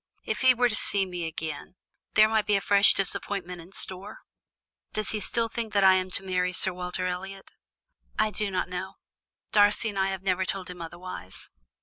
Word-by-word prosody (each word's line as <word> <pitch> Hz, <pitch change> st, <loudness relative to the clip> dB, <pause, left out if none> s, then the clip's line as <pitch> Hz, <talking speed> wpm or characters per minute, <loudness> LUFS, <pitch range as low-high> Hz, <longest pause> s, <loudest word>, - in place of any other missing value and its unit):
If 215 Hz, -1 st, -3 dB
he 260 Hz, -1 st, +6 dB
were 245 Hz, +1 st, +3 dB
to 230 Hz, -, -3 dB
see 200 Hz, -2 st, +2 dB
me 175 Hz, -3 st, -5 dB
again, 160 Hz, +1 st, -6 dB, 0.4 s
there 215 Hz, 0 st, +7 dB
might 220 Hz, -1 st, 0 dB
be 210 Hz, -, +3 dB
a -, -, +3 dB
fresh 200 Hz, +1 st, +6 dB
disappointment 185 Hz, -2 st, -1 dB
in 170 Hz, +3 st, -15 dB
store. 195 Hz, +2 st, -5 dB, 0.7 s
Does 215 Hz, -, -2 dB
he 215 Hz, -, -2 dB
still 230 Hz, +3 st, -1 dB
think 225 Hz, -2 st, -5 dB
I 190 Hz, -2 st, +6 dB
am 185 Hz, 0 st, 0 dB
to 190 Hz, -, -3 dB
marry 180 Hz, -1 st, -1 dB
Sir 185 Hz, 0 st, +2 dB
Walter 180 Hz, +1 st, -3 dB
Elliot?" 190 Hz, +2 st, -6 dB, 0.7 s
"I 215 Hz, 0 st, +2 dB
do 210 Hz, +1 st, -2 dB
not 185 Hz, -1 st, -2 dB
know. 185 Hz, +2 st, -6 dB, 0.6 s
Darcy 210 Hz, +2 st, +5 dB
and 200 Hz, -2 st, -4 dB
I 190 Hz, -, +2 dB
have 190 Hz, -1 st, -4 dB
never 190 Hz, -1 st, +1 dB
told 185 Hz, -1 st, -4 dB
him 180 Hz, -1 st, -10 dB
otherwise." 165 Hz, -, -9 dB
190 Hz, 195 wpm, -27 LUFS, 180-210 Hz, 0.7 s, there